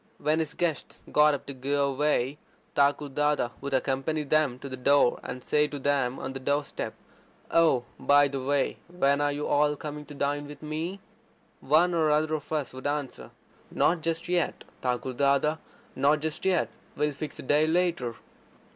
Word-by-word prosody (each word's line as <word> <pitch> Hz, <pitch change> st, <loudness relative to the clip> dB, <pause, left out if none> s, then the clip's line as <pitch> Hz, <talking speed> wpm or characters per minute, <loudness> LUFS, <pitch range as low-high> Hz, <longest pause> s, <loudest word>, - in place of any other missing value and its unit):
When 155 Hz, +1 st, +1 dB
his 160 Hz, -1 st, -2 dB
guests 170 Hz, -4 st, -2 dB
got 150 Hz, 0 st, +5 dB
up 140 Hz, -, -8 dB
to 140 Hz, -, -6 dB
go 140 Hz, +2 st, 0 dB
away, 140 Hz, 0 st, 0 dB, 0.3 s
Thakur 145 Hz, +1 st, +2 dB
Dada 150 Hz, -2 st, +1 dB
would 140 Hz, 0 st, -1 dB
accompany 135 Hz, +4 st, 0 dB
them 150 Hz, -3 st, +2 dB
to 140 Hz, -, -8 dB
the 130 Hz, -, -5 dB
door, 135 Hz, 0 st, +3 dB
and 125 Hz, 0 st, -7 dB
say 150 Hz, 0 st, +2 dB
to 145 Hz, -, -6 dB
them 135 Hz, -2 st, 0 dB
on 135 Hz, -, -5 dB
the 135 Hz, -, -5 dB
door 145 Hz, +3 st, +1 dB
step: -, -, -6 dB, 0.6 s
"Oh, 160 Hz, -7 st, +4 dB, 0.2 s
by 145 Hz, 0 st, +5 dB
the 135 Hz, -1 st, -4 dB
way, 140 Hz, +1 st, 0 dB
when 145 Hz, -5 st, +1 dB
are 145 Hz, 0 st, +2 dB
you 145 Hz, +1 st, -3 dB
all 150 Hz, 0 st, +2 dB
coming 150 Hz, 0 st, -7 dB
to 145 Hz, -, -10 dB
dine 145 Hz, +1 st, -1 dB
with 145 Hz, +1 st, -11 dB
me?" 160 Hz, +6 st, -4 dB, 0.6 s
One 165 Hz, +5 st, +3 dB
or 160 Hz, -2 st, +2 dB
other 155 Hz, +1 st, +2 dB
of 155 Hz, 0 st, -4 dB
us 150 Hz, -6 st, -2 dB
would 130 Hz, +2 st, -4 dB
answer: 145 Hz, -2 st, -3 dB, 0.4 s
"Not 170 Hz, -1 st, +2 dB
just 165 Hz, +1 st, -2 dB
yet, 175 Hz, -2 st, 0 dB, 0.2 s
Thakur 125 Hz, +1 st, -1 dB
Dada, 140 Hz, +4 st, +2 dB, 0.4 s
not 150 Hz, +2 st, +3 dB
just 160 Hz, +3 st, -4 dB
yet. 185 Hz, -3 st, +2 dB, 0.3 s
We'll 150 Hz, 0 st, +1 dB
fix 145 Hz, +2 st, -6 dB
a -, -, -7 dB
day 150 Hz, +3 st, +3 dB
later." 165 Hz, -8 st, 0 dB
145 Hz, 180 wpm, -27 LUFS, 140-155 Hz, 0.6 s, got